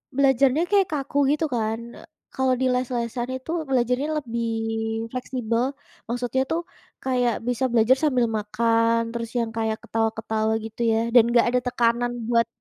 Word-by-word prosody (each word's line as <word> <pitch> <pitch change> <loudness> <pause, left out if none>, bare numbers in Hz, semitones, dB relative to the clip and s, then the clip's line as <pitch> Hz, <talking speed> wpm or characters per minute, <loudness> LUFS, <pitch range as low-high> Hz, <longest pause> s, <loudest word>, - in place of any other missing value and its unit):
belajarnya 275 +2 +3
kayak 395 -2 +4
kaku 285 -1 -3
gitu 305 +2 +1
kan, 225 -2 -1 0.2
e - - -12 0.3
kalau 260 -1 +1
di - - +2
les-lesan 245 -1 -2
itu 260 +5 -6 0.2
belajarnya 250 +3 +1
lebih 235 -1 -2 0.6
fleksibel. 245 -2 -2 0.5
Maksudnya 245 +2 -1
tuh, 330 +1 +1 0.4
kayak 250 -2 +1
bisa 245 +1 0
belajar 235 +3 +4
sambil 255 -5 +3
makan, 230 +2 +2
terus 230 -1 -4
yang 230 -1 0
kayak 220 -1 0
ketawa-ketawa 220 0 -1
gitu 225 +2 -8
ya, 220 - +2
dan 240 - +8
enggak 235 0 +4
ada 250 - +3
tekanan 240 0 +1 0.2
buat 230 -1 +3
240 Hz, 150 wpm, -24 LUFS, 230-260 Hz, 0.6 s, dan